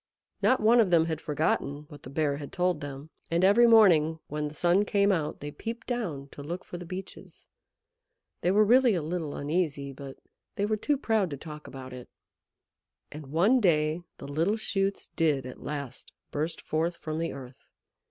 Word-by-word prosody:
Not 255 - +4
one 230 +3 +5
of 215 -5 +4
them 165 -2 +4
had 160 -1 -3
forgotten 145 -1 -1
what 145 -3 -12
the - - -10
Bear 145 0 0
had 145 -1 -8
told 180 -3 0
them, 145 +2 -8 0.2
and 170 +2 +1
every 215 +5 +6
morning 170 -9 +6
when 150 0 -2
the 150 - -9
sun 175 +5 +3
came 200 -1 +2
out 160 -6 -2
they 145 +1 -5
peeped 230 +8 -6
down 180 - -3
to 145 - -10
look 170 +5 -6
for 175 - -7
the 175 - -9
Beeches. 185 +2 -9 1.0
They 175 - +1
were 210 +3 +5
really 245 0 +5
a 170 - -1
little 160 -2 -3
uneasy, 145 -2 -2
but 135 0 -9 0.4
they 200 - 0
were 215 +1 +1
too 285 +7 0
proud 220 -8 +1
to 140 - -5
talk 150 0 -9
about 130 -1 -9
it. 125 -1 -10 1.0
And 150 -1 -9
one 185 - +3
day 155 -3 +2 0.2
the - - -9
little 165 +9 0
shoots 195 -2 -1
did 150 -6 0
at 130 - -9
last 140 -4 -6 0.2
burst 155 +3 -2
forth 165 +2 -1
from 155 0 -4
the 165 - -1
earth. 130 -2 -11
160 Hz, 190 wpm, -28 LUFS, 145-195 Hz, 1.0 s, every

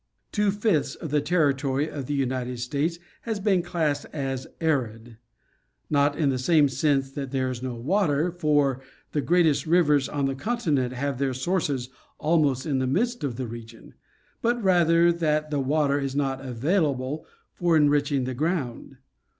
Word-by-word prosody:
T'wo 210 -1 +1
fifths 200 - 0
of 160 - -7
the 150 -1 +2
territory 145 -3 +1
of 145 -4 -6
the 145 - -1
United 125 -2 -2
States 140 +8 -1 0.2
has 220 -3 -3
been 195 -3 +2
classed 160 -5 -1
as 135 -3 -3
arid; 120 -8 -2 0.7
not 145 0 +2
in 150 -3 +2
the 130 - -2
sense 140 -1 +2
that 135 -1 -5
there 130 -1 -1
is 125 -1 -6
no 130 -2 -4
water, 155 - +1
for 145 -6 +1 0.3
the 150 - 0
greatest 165 -2 +2
rivers 150 -5 +3
on 145 -2 -1
the 135 - 0
continent 150 - -1
have 135 +1 -3
their 135 -2 0
sources 135 -3 -1 0.3
almost 150 -5 +1
in 140 -4 0
the 130 - 0
midst 235 - 0
of 135 -5 -2
the 130 +1 -4
region; 115 0 -10 0.5
but 240 +1 +1
rather 170 -2 +4
that 155 -2 0
the 145 - 0
water 140 +1 +1
is 135 -1 -3
not 135 -2 -1
available 140 - -1 0.3
for 170 -2 +2
enriching 145 -2 +2
the 130 +1 -3
ground. 140 -3 -3
145 Hz, 160 wpm, -25 LUFS, 130-165 Hz, 0.7 s, rather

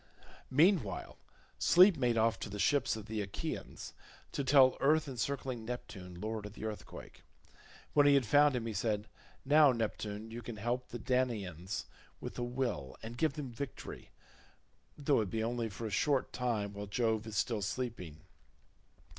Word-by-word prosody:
Meanwhile 145 - +2 0.4
Sleep 185 +2 +7
made 125 -5 +1
off 115 0 +2
to - - -5
the 105 - -6
ships 135 +3 +2
of 110 -2 -7
the 110 -1 -3
Achaeans, 100 -1 -5 0.4
to 140 - -2
tell 130 -1 +6
earth 155 +2 +3
encircling 130 -2 -3
Neptune, 95 -7 -7
lord 110 +1 -4
of 105 - -12
the 110 - -7
earthquake. 110 -1 -8 0.7
When 145 -1 +6
he 140 - +7
had 135 -3 +3
found 145 +4 +5
him 120 -2 -2
he 115 - -3
said, 105 0 -1 0.4
"Now, 145 0 +7
Neptune, 110 -2 -3
you 120 +1 -6
can 120 0 -7
help 120 +4 -2
the 120 - -6
Danaans 105 - -1 0.3
with - - -6
a - - -1
will, 120 - -3
and 115 +1 -6
give 155 +3 +1
them 140 -4 -6
victory 140 +2 -7 0.9
though 145 -4 +2
it 105 - -3
be 110 +3 -1
only 115 0 -1
for 110 +3 -7
a 110 - -3
short 140 +5 +1
time 110 -5 -1
while 100 0 -6
Jove 110 +1 0
is 110 - -4
still 115 -4 0
sleeping. 100 -8 -4
115 Hz, 165 wpm, -33 LUFS, 105-135 Hz, 0.9 s, Sleep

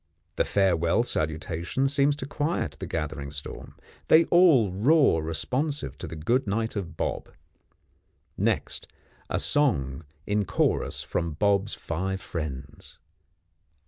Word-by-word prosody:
The - - +1
farewell 90 0 +2
salutation 80 - -1
seems 140 +1 +2
to 140 - -6
quiet 145 - -2
the - - -5
gathering 75 -3 -4
storm. 75 +1 -7 0.3
They 165 +1 +6
all 155 - +6
roar 120 - +4
responsive 130 - -2
to 90 - -5
the 80 - -7
good 115 - 0
night 110 +3 -1
of 85 -5 -5
Bob. - - -3 1.1
Next, - - -1 0.4
a - - 0
song 80 - +2 0.2
in 105 0 0
chorus 90 - 0
from 85 -2 -2
Bob's 100 +4 +1
five 95 +4 -3
friends. 75 -7 -7
95 Hz, 120 wpm, -26 LUFS, 80-135 Hz, 1.1 s, They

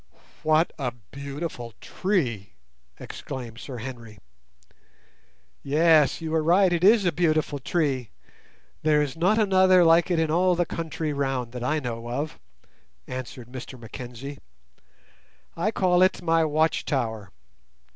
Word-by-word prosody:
"What 155 +2 +2
a 125 -3 -2 0.2
beautiful 140 -4 -6
tree!" 130 - -2 0.5
exclaimed 120 -3 -7
Sir 125 +3 -7
Henry. 115 -3 -8 1.4
"Yes, 155 0 +3
you 160 -1 -4
are 160 - +2
right; 175 +3 +4
it 170 0 -1
is 210 +1 +6
a 175 - +3
beautiful 155 -4 0
tree. 135 -5 -1 0.7
There 150 -1 +3
is 135 -2 -4
not 185 +6 +2
another 190 -3 +5
like 165 +1 +5
it 175 - +1
in 160 -1 +1
all 180 +2 +3
the 175 0 +1
country 160 -2 -4
round, 135 -4 -2
that 125 0 -6
I 155 +5 +1
know 120 -3 -5
of," 145 +5 -4 0.7
answered 125 -1 -7
Mr 130 0 -8
Mackenzie. 125 +4 -8 1.2
"I 175 +6 0
call 180 -4 +2
it 185 -1 +3
my 165 -1 +3
watch 155 +1 +1
tower. 110 - -2
150 Hz, 135 wpm, -25 LUFS, 125-170 Hz, 1.4 s, is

